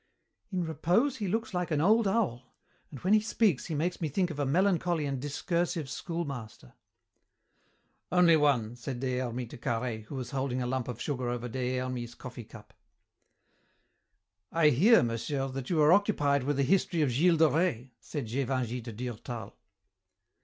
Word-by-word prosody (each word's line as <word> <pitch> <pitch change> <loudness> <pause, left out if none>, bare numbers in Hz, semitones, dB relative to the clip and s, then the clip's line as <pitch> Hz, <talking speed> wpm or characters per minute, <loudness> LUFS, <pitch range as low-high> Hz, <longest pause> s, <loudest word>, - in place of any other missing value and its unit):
"In 185 -2 -1
repose 175 - +1
he 205 - -3
looks 220 +2 -2
like 180 -1 -1
an 155 -3 +1
old 215 +6 +4
owl, 175 - -1 0.3
and 140 - -9
when 190 +3 +2
he 215 - +7
speaks 215 - +1
he 160 - -3
makes 175 +5 -1
me 160 - -1
think 180 +4 0
of 150 - -7
a 145 - 0
melancholy 175 0 +2
and 135 -2 -3
discursive 165 +2 -1
schoolmaster." 135 - -6 1.4
"Only 180 -2 +6
one," 130 -7 +2
said 120 +1 -6
Des 130 -1 -1
Hermies 125 -1 -3
to - - -10
Carhaix, 115 -2 -3
who 140 - -7
was 125 -2 -5
holding 130 -2 -1
a 125 - -1
lump 130 0 -2
of 125 -2 -5
sugar 130 -4 -2
over 120 0 -3
Des 125 +1 -2
Hermies's 125 -2 -4
coffee 125 -2 -9
cup. 110 0 -14 1.8
"I 165 -2 +4
hear, 200 - +5
monsieur, 135 +4 -2
that 130 -1 -6
you 170 - +1
are 150 +3 +7
occupied 145 - +2
with 145 0 0
a 140 - +3
history 170 +1 +2
of 135 - +1
Gilles 165 +7 +3
de 160 0 +6
Rais," 150 -6 0
said 145 0 -5
Gévingey 125 0 -2
to 120 - -7
Durtal. 120 0 -6
140 Hz, 175 wpm, -30 LUFS, 125-170 Hz, 1.8 s, he